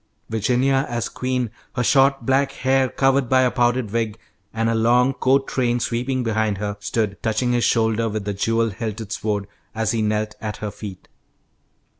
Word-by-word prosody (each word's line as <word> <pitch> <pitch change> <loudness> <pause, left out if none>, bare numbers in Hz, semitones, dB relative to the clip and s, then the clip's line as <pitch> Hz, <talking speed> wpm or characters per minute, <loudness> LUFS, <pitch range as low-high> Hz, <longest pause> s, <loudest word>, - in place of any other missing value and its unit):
Virginia 125 +5 +2
as 120 -1 -2
queen, 125 -3 -2 0.2
her 125 - 0
short 135 0 +3
black 135 +1 +2
hair 130 0 +2
covered 135 -1 +2
by 130 0 +5
a 125 - +2
powdered 120 -3 +1
wig, 115 -1 -1 0.3
and 115 0 -1
a 115 - +2
long 120 +3 +3
court 135 +1 +2
train 120 -2 0
sweeping 125 +2 -1
behind 110 -3 0
her, 100 0 -3
stood 105 -1 -2
touching 110 +3 0
his 120 -1 +1
shoulder 115 0 +2
with 105 -1 -4
the 105 - -2
jewel 115 +3 +1
hilted 110 0 -5
sword, 105 -2 -2 0.3
as 110 -1 0
he 115 -2 0
knelt 105 0 0
at 105 -2 -4
her 105 -1 -4
feet. 100 -4 -9
115 Hz, 175 wpm, -22 LUFS, 110-130 Hz, 0.3 s, by